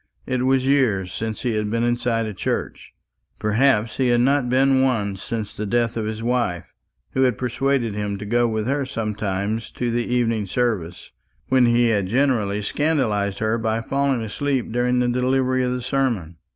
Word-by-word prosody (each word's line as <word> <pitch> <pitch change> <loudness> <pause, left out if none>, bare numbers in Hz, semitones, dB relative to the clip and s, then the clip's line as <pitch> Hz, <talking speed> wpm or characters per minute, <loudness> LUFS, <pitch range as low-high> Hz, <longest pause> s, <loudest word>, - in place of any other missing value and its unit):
It 130 0 -1
was 130 -1 +2
years 110 -10 +2
since 110 -1 -4
he 120 -3 0
had 105 -1 -1
been 115 +2 0
inside 120 -1 0
a 110 - -4
church; - - -4 0.4
perhaps 110 0 +2
he 130 - +2
had 120 -1 +3
not 135 0 +2
been 135 +1 +3
once 105 -7 0
since 110 -4 -4
the 105 - -4
death 120 +2 +1
of 110 -2 -2
his 110 +1 -4
wife, 120 -8 -1 0.4
who 130 - 0
had 125 -5 +2
persuaded 125 -2 0
him 105 -1 -3
to 105 - -7
go 120 +3 +2
with 110 -1 -2
her 140 +3 0
sometimes 105 -2 -3
to 120 -1 -2
the 120 0 -1
evening 115 -4 +1
service, 95 -6 -2 0.4
when 130 -2 +4
he 120 0 +3
had 100 -4 +1
generally 110 -4 +1
scandalised 110 -8 0
her 110 +1 0
by 110 0 0
falling 135 0 0
asleep 130 +3 -2
during 125 +1 +1
the 125 - +2
delivery 130 +1 +1
of 125 - 0
the 125 -1 -3
sermon. 120 -11 -1
120 Hz, 180 wpm, -22 LUFS, 105-130 Hz, 0.4 s, when